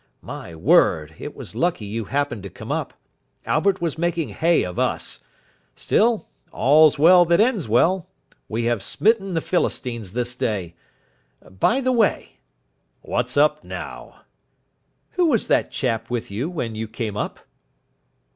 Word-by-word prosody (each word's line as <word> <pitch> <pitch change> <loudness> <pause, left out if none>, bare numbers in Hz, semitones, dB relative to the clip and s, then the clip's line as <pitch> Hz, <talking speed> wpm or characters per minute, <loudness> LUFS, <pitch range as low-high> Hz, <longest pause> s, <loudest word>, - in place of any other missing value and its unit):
My 85 - -8
word, 80 - +3
it 145 - -7
was - - -9
lucky 170 -11 -1
you 110 +2 -4
happened 140 -4 -2
to 100 - -8
come - - -9
up. - - -3 0.5
Albert 190 +4 +1
was 165 -2 -2
making 170 -5 -1
hay 165 +10 +2
of 90 -1 -5
us. - - -1 0.6
Still, 225 0 +1 0.2
all's 150 +3 +5
well 175 +4 +7
that 170 +2 +3
ends 220 - +2
well. 165 - +2 0.4
We 115 +2 -2
have 120 -3 0
smitten 195 - +1
the 165 - +1
Philistines 120 - -2
this 120 0 -2
day. 100 -8 -2 0.7
By 160 - +1
the 255 0 +1
way 235 -3 0 0.3
" - - -47 0.3
"What's - - -2
up - - +3
now?" - - -8 0.9
"Who 360 -2 +2
was 240 -9 +2
that - - +1
chap 115 -4 -2
with 120 -4 -3
you 120 +11 -2
when 125 -11 -4
you 110 +1 -4
came 110 -1 -4
up?" - - -4
140 Hz, 150 wpm, -22 LUFS, 110-175 Hz, 0.9 s, well